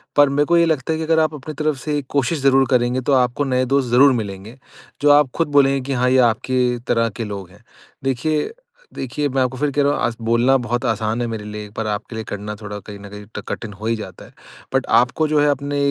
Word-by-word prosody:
पर 145 -1 +6
मेरे 145 +2 +1
को 170 +2 +3
ये 170 - +5
लगता 160 -1 0
है - - -2
कि - - -2
अगर 160 0 +3
आप 155 0 +1
अपनी 150 +2 -8
तरफ 155 -2 +1
से 150 +2 -2
कोशिश 145 +3 0
ज़रूर 135 -1 +4
करेंगे 125 +1 +2
तो 140 +3 0
आपको 125 +4 -1
नए 130 -1 +1
दोस्त 135 -3 +2
ज़रूर 135 +3 +6
मिलेंगे। 100 +4 -8 0.4
जो 145 0 +5
आप 145 -3 +5
खुद 165 - +1
बोलेंगे 135 -1 +4
की 140 - -2
हाँ, 125 0 +1
ये 130 - +3
आपके 125 +1 +2
तरह 115 -1 +2
के 115 +2 -6
लोग 100 -4 -6
हैं। 90 - -20 0.4
देखिए, 135 - -1 0.4
देखिए 135 +3 -2
मैं 135 0 0
आपको 130 0 -1
फिर 145 +1 0
कह 145 - +1
रहा 145 +1 +2
हूँ - - -3
आज 120 - 0
बोलना 115 +4 +3
बहुत 120 -1 -2
आसान 110 +2 -1
है - - 0
मेरे 110 -2 -5
लिए 105 0 -7
पर 110 -1 -3
आपके 105 +2 -4
लिए 110 - -4
करना 105 +1 -5
थोड़ा 105 0 -6
कहीं 100 -1 -8
न 100 0 -10
कहीं 105 0 -10
ट - - -3
कठिन 110 -3 -5
हो 105 +3 -9
ही 115 0 +1
जाता 95 -5 -9
है। - - -18 0.4
बट - - +2
आपको 125 +6 +2
जो 150 0 +2
है 150 - +3
अपने 145 +1 -1
125 Hz, 255 wpm, -20 LUFS, 110-145 Hz, 0.4 s, पर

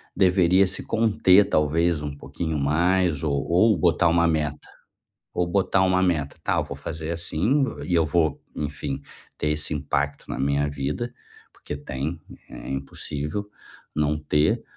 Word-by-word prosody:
deveria 95 0 +4
se 95 - -3
conter, 105 -3 +4
talvez, 80 +1 +1
um 75 -1 -5
pouquinho 75 +3 -4
mais 85 +2 +2
ou 70 -3 0
ou 95 +4 +4
botar 85 +1 +3
uma 85 +1 +3
meta 75 -2 -1 0.7
ou 90 - 0
botar 95 +1 +2
uma 95 0 +3
meta: 80 -6 0
"Tá, - - +1
eu - - +1
vou - - -7
fazer, 80 +1 -5
assim, 85 - +1 0.2
e 90 - -2
eu 80 -1 +4
vou, 80 -1 +1
enfim, 70 -2 -4 0.4
ter - - -1
esse 75 +1 -1
impacto 70 -1 -2
na - - -4
minha 70 +2 +1
vida", 75 - -3 0.4
porque - - -7
tem, 75 +3 -4 0.3
é - - -9
impossível 75 +7 -4 0.5
não 75 0 +1
ter, 75 +1 +1
80 Hz, 150 wpm, -24 LUFS, 75-90 Hz, 0.7 s, deveria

